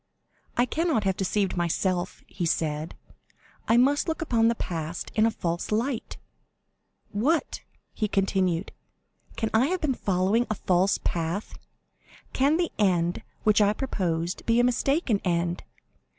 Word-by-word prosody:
"I 240 - +4
cannot 315 -5 0
have 190 -2 +1
deceived 195 0 0
myself," 175 +2 -1
he 175 -3 -3
said; 155 0 -1 0.7
"I 230 - +4
must 280 +6 +3
look 320 -1 -1
upon 230 -8 +2
the 235 - +2
past 165 -4 -4
in 220 +1 +4
a - - +3
false 170 -5 -3
light. 230 +3 -1 0.9
What!" 280 +11 0 0.3
he 215 - -1
continued, 190 -3 0 0.6
"can 225 -1 -2
I 230 +5 +4
have 370 +3 -1
been 295 -4 +1
following 200 +3 +1
a 215 - 0
false 185 +1 +2
path?—can 200 - -3
the 345 -1 0
end 175 -4 +2 0.2
which 215 0 +4
I 205 0 +4
proposed 175 -9 -2
be 230 +1 +4
a - - +5
mistaken 250 - +1
end? 175 -1 0
205 Hz, 135 wpm, -26 LUFS, 175-240 Hz, 0.9 s, a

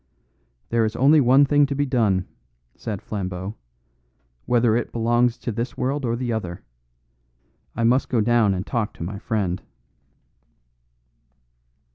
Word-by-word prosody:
"There 115 -1 +2
is 110 0 -1
only 145 +4 +5
one 135 +3 +5
thing 145 0 +3
to 140 - -3
be 145 +1 +1
done," 110 -9 +1 0.5
said 105 -4 -6
Flambeau, 95 -1 -4 0.9
"whether 120 -2 +3
it 120 - -2
belongs 120 +1 +1
to 120 - -4
this 115 +4 -4
world 135 +2 -1
or 115 -1 0
the 120 -1 -2
other. 90 -6 -5 1.1
I 115 - -1
must 125 +4 +2
go 120 - +1
down 110 -3 +3
and 90 +2 -4
talk 115 -3 -2
to - - -7
my 100 +4 -5
friend." 95 -5 -2
115 Hz, 140 wpm, -23 LUFS, 105-125 Hz, 1.1 s, only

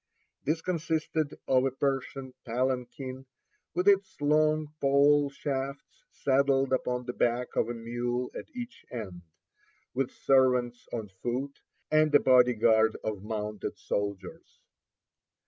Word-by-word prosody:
This 160 +3 0
consisted 160 -3 -1
of 130 -1 +4
a 135 - +2
Persian 135 0 -2
palanquin, 130 +2 -3 0.5
with 180 +2 0
its 195 -1 +3
long 155 +1 +2
pole 140 +1 +4
shafts 140 - -5
saddled 135 -1 +2
upon 125 -1 -1
the 125 - -4
back 120 +1 0
of 115 - +1
a 120 - -3
mule 120 +2 -3
at - - -7
each 245 -1 -7
end; 100 -8 -6 0.7
with 135 0 0
servants 125 -3 +2
on 110 -4 -4
foot, 130 +4 -3 0.3
and 155 -1 +4
a - - +9
body 125 -1 +5
guard 110 0 +4
of 105 -3 -3
mounted 105 -1 -4
soldiers. 100 -1 -4
130 Hz, 125 wpm, -29 LUFS, 120-145 Hz, 0.7 s, a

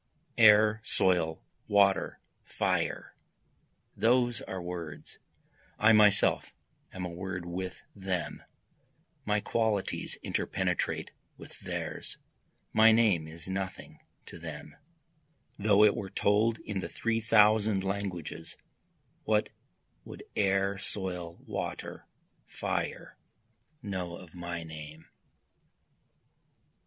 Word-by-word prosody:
Air, 105 0 +7
soil, 85 -4 +2 0.2
water, 100 -2 +3 0.2
fire - - -1 0.8
those 120 0 +2
are 95 - -5
words, 85 -4 -7 0.6
I 110 +1 +5
myself 105 -2 +4 0.4
am 90 -1 -5
a - - -4
word 90 0 -5
with 90 +1 -5
them 95 -3 -3 0.8
my 105 0 +1
qualities 110 -4 -1
interpenetrate - - -1 0.3
with - - -13
theirs - - -5 0.6
my 110 +1 +7
name 105 -8 +3
is 80 +2 -8
nothing 95 0 -5 0.3
to - - -11
them, 75 -2 -8 0.8
Though 105 0 +5
it 105 - +5
were 95 - -5
told 110 +4 +2
in 105 -2 -4
the - - -5
three 115 -1 -1
thousand 105 -2 +4
languages, 90 -5 -4 0.7
what 105 -1 +1 0.5
would - - -10
air, 95 -1 +1
soil, 90 -4 -4
water, - - -5 0.4
fire, - - -4 0.6
know 90 -4 -4
of 90 -3 -14
my 85 -1 -5
name? 80 0 -9
95 Hz, 100 wpm, -30 LUFS, 85-105 Hz, 0.8 s, Air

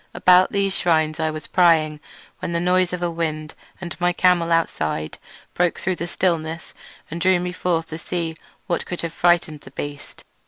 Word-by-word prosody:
About 180 0 +5
these 200 -1 0
shrines 160 -3 +1
I 160 0 +1
was 155 0 -6
prying 160 -4 +3 0.4
when 170 - -4
the 170 - +1
noise 180 +1 +2
of 180 -1 -3
a 175 - 0
wind 155 -2 -3 0.3
and 175 -2 -6
of - - -19
my 175 0 +3
camel 175 -1 +2
outside 80 - -1 0.3
broke 175 -1 +1
through 185 -1 -2
the 170 - -4
stillness 165 -2 -2 0.4
and 170 +2 -5
drew 185 0 +4
me 180 0 -3
forth 165 -2 -1
to 160 - -6
see 165 -1 -3 0.3
what 170 - -2
could 175 - -4
have 165 -1 -4
frightened 170 -4 +2
the - - -13
beast. 145 +1 -8
170 Hz, 190 wpm, -22 LUFS, 160-180 Hz, 0.4 s, About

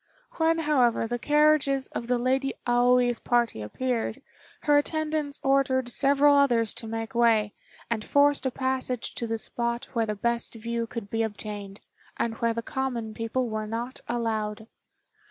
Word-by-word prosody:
When, 325 0 +3
however, 270 -8 +2
the 240 +1 -3
carriages 295 -1 +3
of 235 - -5
the 250 0 +2
Lady 265 +2 0
Aoi's 245 0 +3
party 235 - +1
appeared, 240 - -2 0.4
her 295 -1 +4
attendants 305 -1 -1
ordered 265 -2 +2
several 280 +3 +4
others 240 -6 +3
to 225 - -7
make 225 0 -4
way, 225 -3 +3 0.3
and 225 -2 -2
forced 285 +1 +3
a - - +2
passage 260 -1 -2
to 235 - -3
the 225 0 -1
spot 235 +1 -3
where 230 -2 0
the 210 - -2
best 235 +3 -1
view 230 +1 -3
could 225 -4 -7
be 225 - 0
obtained, 210 -2 -5 0.4
and 230 - -1
where 230 0 +2
the 230 - -3
common 240 -5 -3
people 230 +3 -2
were 215 -1 -3
not 235 +4 -5
allowed. 220 -2 -2
240 Hz, 155 wpm, -27 LUFS, 225-270 Hz, 0.4 s, her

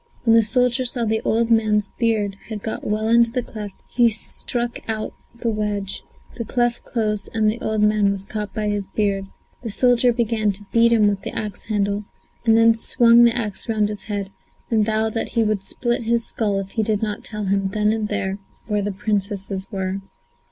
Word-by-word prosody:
When 225 -2 +5
the 230 - +7
soldier 250 +3 +2
saw 240 -1 -1
the 220 0 0
old 230 +1 +1
man's 215 -2 +3
beard 215 -4 +1
had 215 -2 -6
got 220 - -4
well 215 +1 -1
into 235 0 +5
the 250 +1 -1
cleft, 210 -4 -7
he 240 -1 +3
struck 235 +2 -2
out 215 -1 -2 0.2
the 235 -1 -1
wedge; 205 -2 -2 0.4
the 230 - -2
cleft 240 +1 0
closed 210 -4 -2
and 215 -1 +2
the 215 +2 0
old 215 -1 0
man 210 -1 +3
was 195 -1 -2
caught 210 0 -4
by 215 -1 -2
the 205 -1 -1
beard. 200 -2 0 0.3
The 235 - -5
soldier 245 +2 +4
began 225 -3 0
to 205 +2 -10
beat 235 0 +5
him 220 -3 +5
with 200 -1 0
the - - -5
axe 210 -3 -4
handle, 205 -1 -1 0.4
and 225 0 +6
then 230 0 +6
swung 235 +1 +5
the 235 0 +3
axe 210 -1 -3
round 215 -2 +1
his 210 -1 -3
head, 200 -2 -4 0.4
and 220 -2 +3
vowed 220 0 0
that 225 - -2
he 230 -2 +3
would 215 -2 0
split 240 +5 -1
his 235 0 0
skull 205 -3 -1
if 195 0 -4
he 225 - 0
did 215 -1 0
not 210 -1 -3
tell 210 -2 -5
him, 195 0 +1
there 210 +2 -3
and 215 0 +1
then, 190 -1 -2 0.3
where 210 -2 0
the 205 +1 -2
Princesses 195 -1 -2
were. 190 -1 -3
215 Hz, 205 wpm, -22 LUFS, 205-230 Hz, 0.4 s, the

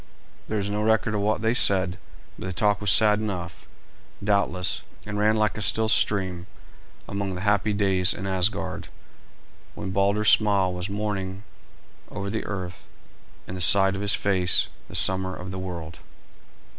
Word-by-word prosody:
There 110 - -2
is 100 -1 -2
no 105 +1 -2
record 110 0 +1
of 105 - -1
what 105 +1 -1
they 115 +1 +2
said, 95 -5 +1 0.4
but - - -6
the 95 - -4
talk 105 +3 0
was 105 - +1
sad 105 +1 +7
enough, 90 -6 -6 0.6
doubtless, 100 -3 0 0.2
and 105 0 -5
ran 105 +1 +2
like 110 -1 0
a - - -5
still 110 +1 0
stream 95 -4 +2 0.6
among 100 -1 -4
the 90 - -6
happy 105 +1 +1
days 95 -3 +3
in 95 - -5
Asgard 95 +2 -1 0.9
when 100 -2 -6
Balder's 100 +2 +2
smile 100 -4 +2
was 90 +2 -5
morning 100 -2 -4 0.7
over 100 -1 -5
the 110 - -4
earth 90 -3 -7 0.6
and 90 - -7
the 90 - -5
sight 95 +1 +5
of 100 - -5
his 100 -1 +4
face 90 -3 +2 0.2
the - - -10
summer 95 0 +2
of 95 +1 -8
the 95 - -6
world. 85 -3 -7
100 Hz, 165 wpm, -24 LUFS, 95-105 Hz, 0.9 s, sad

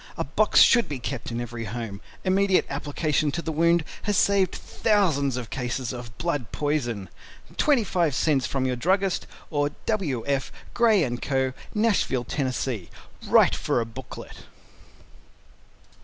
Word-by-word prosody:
A - - 0
box 205 +10 +3
should 235 0 +6
be 145 - -3
kept 125 0 -5
in 115 0 -3
every 120 -1 -5
home. 110 -2 -5 0.2
Immediate 190 0 +3
application 145 +1 0
to 170 - -2
the 160 - -2
wound 170 +2 +3 0.2
has 205 -2 0
saved 195 -2 +3
thousands 155 - +1
of 120 -3 -6
cases 125 0 -3
of 120 -3 -9
Blood 145 -6 -2
Poison. 120 -10 -1 0.5
25 190 - +2
cents 135 -1 +2
from 135 -1 -1
your 130 -1 0
Druggist 190 +7 0 0.2
or 145 -2 +1 0.2
W. 160 - -1
F. 140 -2 -1 0.2
GRAY 220 - +4
& - - -15
CO. 130 -2 0 0.2
Nashville, 210 - +2
Tenn. 130 +2 -1 0.8
Write - - +5
for 115 - 0
Booklet. 115 +2 -9
145 Hz, 140 wpm, -25 LUFS, 125-185 Hz, 0.8 s, should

